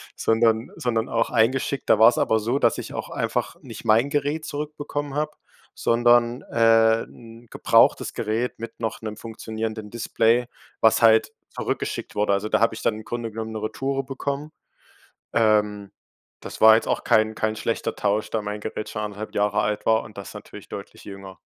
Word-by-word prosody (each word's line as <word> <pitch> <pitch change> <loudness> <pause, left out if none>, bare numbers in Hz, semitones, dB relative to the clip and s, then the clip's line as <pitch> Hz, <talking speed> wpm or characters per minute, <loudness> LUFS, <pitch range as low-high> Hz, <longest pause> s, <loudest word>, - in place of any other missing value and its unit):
sondern 115 0 +2
sondern 115 -2 -1
auch 115 0 0
eingeschickt. 125 +3 +1
Da 105 - +5
war's 115 +2 +6
aber 110 - +2
so, 115 +5 -1
dass - - +2
ich - - -7
auch - - -5
einfach - - -2
nicht - - -10
mein 115 +5 +3
Gerät 145 +2 -1
zurückbekommen 145 -1 -5
habe, 150 0 -1 0.4
sondern, 120 +1 +3
äh, 115 -1 +4
'n 115 0 -15
gebrauchtes - - +3
Gerät 115 +4 -2
mit 115 +1 -9
noch 115 -2 -3
'nem 110 -1 -6
funktionierenden 110 -1 -6
Display, 115 +1 +1 0.3
was 110 - +4
halt 110 -1 +5 0.2
zurückgeschickt - - -4
wurde. 105 -1 +1
Also 100 +2 0
da 110 - +1
habe 115 0 +3
ich 110 - -8
dann 115 - +1
im 110 - -9
Grunde 115 0 -5
genommen 110 0 -5
'ne 110 -1 -5
Retoure 135 +5 -2
bekommen. 140 +3 -4 0.8
Ähm, 105 -2 +1 0.5
das - - -9
war 110 0 +8
jetzt 115 - 0
auch - - -1
kein 110 0 +3
kein 110 0 -1
schlechter 115 +1 -2
Tausch, 105 +1 0
da 110 - -1
mein 105 0 -5
Gerät 105 0 -5
schon 105 - -4
1,5 105 0 -6
Jahre 105 0 +1
alt 105 0 -2
war 110 0 +3
und 105 - -14
das 100 - -8
natürlich - - -11
deutlich - - -9
jünger. 95 -1 -10
110 Hz, 180 wpm, -24 LUFS, 110-120 Hz, 0.8 s, war